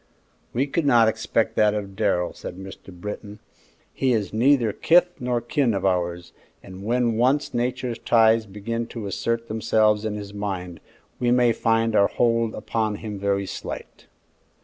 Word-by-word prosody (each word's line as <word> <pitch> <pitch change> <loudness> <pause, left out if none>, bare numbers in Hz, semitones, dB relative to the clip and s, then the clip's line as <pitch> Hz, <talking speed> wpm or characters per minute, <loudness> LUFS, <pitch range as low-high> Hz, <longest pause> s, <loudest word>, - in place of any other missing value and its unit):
"We 130 +4 0
could 145 +1 -1
not 120 -4 +5
expect 110 0 0
that 105 0 +4
of 100 -2 -5
Darrell," 90 -2 0
said 90 - -8
Mr. 95 0 -11
Britton. 105 +3 -7 0.6
"He 130 -2 +1
is 105 -4 -1
neither 120 -1 +3
kith 175 +2 +4
nor 125 -1 0
kin 130 -3 0
of 100 - -2
ours, 90 -2 -1 0.3
and 95 +1 -10
when 120 0 +1
once 130 +5 +1
Nature's 120 -1 -2
ties 115 -1 +3
begin 115 +4 -4
to 115 -3 -7
assert 115 +4 -2
themselves 110 -1 +2
in 110 -1 -2
his 100 -1 -7
mind, 95 -4 -5 0.4
we 120 - +1
may 120 -1 +4
find 115 0 +1
our 100 - +5
hold 115 -1 +1
upon 110 -2 -2
him 105 -1 -6
very 100 0 0
slight." - - -8
110 Hz, 160 wpm, -24 LUFS, 100-120 Hz, 0.6 s, not